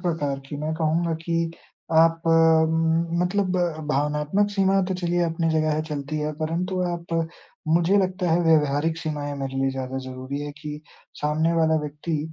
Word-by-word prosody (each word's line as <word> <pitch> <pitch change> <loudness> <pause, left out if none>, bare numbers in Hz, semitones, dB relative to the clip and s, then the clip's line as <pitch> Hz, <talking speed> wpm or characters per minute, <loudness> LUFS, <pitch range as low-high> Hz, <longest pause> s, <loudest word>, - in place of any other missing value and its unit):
प्रकार 155 -6 -1
की। 145 - -6
मैं 155 +2 -2
कहूँगा 165 +1 0
कि 165 -1 0 0.4
आप 165 +1 +4
उम, 165 +1 +3
मतलब 185 0 0 0.3
भावनात्मक 150 +7 +1
सीमा 195 -1 +2
तो 190 - -1
चलिए 175 -1 0
अपनी 165 0 0
जगह 155 -1 +2
है 155 - -1
चलती 150 -1 -4
है। 150 0 -2
परंतु 180 +4 -1
आप 170 0 -7 0.6
मुझे 170 +4 +3
लगता 185 -2 0
है 165 +2 +3
व्यवहारिक 155 0 +3
सीमाएँ 145 -3 -3
मेरे 135 -1 -4
लिए 135 0 +2
ज़्यादा 130 0 -4
ज़रूरी 130 +2 -5
हैं 145 0 -5
कि 150 -1 -6 0.4
सामने 155 +3 +1
वाला 160 -1 +3
व्यक्ति 150 +2 -3
160 Hz, 160 wpm, -24 LUFS, 150-170 Hz, 0.6 s, आप